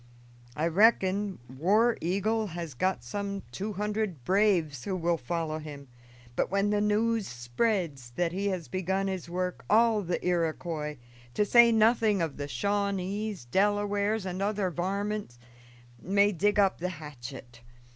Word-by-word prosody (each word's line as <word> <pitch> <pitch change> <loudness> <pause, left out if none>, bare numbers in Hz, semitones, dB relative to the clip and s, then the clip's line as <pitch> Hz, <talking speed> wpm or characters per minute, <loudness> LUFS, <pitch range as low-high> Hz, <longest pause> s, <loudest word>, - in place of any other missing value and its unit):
I 155 - 0
reckon 200 +1 +3
War 200 - +2
Eagle 210 +6 0
has 170 -4 -6
got 185 +10 -1
some 200 -1 -4
two 210 +2 -4
hundred 210 - -2
braves 180 - +2
who 195 - -1
will 170 -1 +1
follow 155 +3 -3
him; 145 -3 -9 0.5
but - - 0
when 200 +1 +1
the 205 0 +2
news 215 +1 +1
spreads 135 - -2
that 175 -1 0
he 195 +3 -2
has 185 -5 -2
begun 190 +1 -1
his 190 -3 -4
work, 180 +1 -3
all 225 0 +4
the 180 -2 -1
Iroquois, 165 -3 -1 0.4
to 210 - +2
say 235 +2 +7
nothing 220 -2 +3
of 160 -4 -2
the 145 0 -4
Shawnees, 200 - -2
Delawares, 205 - +1
and 185 0 -4
other 200 -2 0
varmint, 200 - -3 0.6
may 200 +3 +3
dig 205 +3 +1
up 195 -2 +3
the 180 +2 -2
hatchet. 135 -7 -9
190 Hz, 145 wpm, -29 LUFS, 165-205 Hz, 0.6 s, say